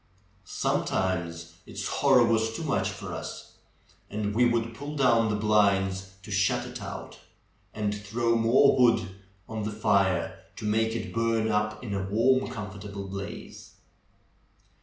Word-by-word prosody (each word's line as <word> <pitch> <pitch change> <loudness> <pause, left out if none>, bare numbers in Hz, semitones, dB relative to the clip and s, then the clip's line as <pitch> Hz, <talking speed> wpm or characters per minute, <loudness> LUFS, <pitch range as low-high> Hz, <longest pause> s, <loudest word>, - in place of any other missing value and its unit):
Sometimes 85 -3 -1
its - - -5
horror 135 -4 +4
was 110 -1 +1
too 165 - -4
much 145 - 0
for - - -7
us, - - -8 0.5
and 105 0 -2
we 120 +3 +4
would 115 -1 +1
pull 145 +5 -7
down 120 -5 +3
the 105 - 0
blinds 95 -3 +2
to 105 - -10
shut 100 0 +1
it - - -8
out, - - -7 0.5
and 105 -1 -2
throw 115 +3 0
more 115 +5 +5
w'ood 115 -6 +4 0.4
on 110 -1 -4
the 105 - -2
fire 100 -3 +1 0.2
to - - -7
make 110 +1 +1
it 115 - -4
burn 115 -1 +1
up 105 +1 -1
in 105 -5 -4
a 100 - -1
warm, 115 +7 +2
comfortable 100 -1 -7
blaze. 100 0 -8
105 Hz, 145 wpm, -27 LUFS, 100-115 Hz, 0.5 s, more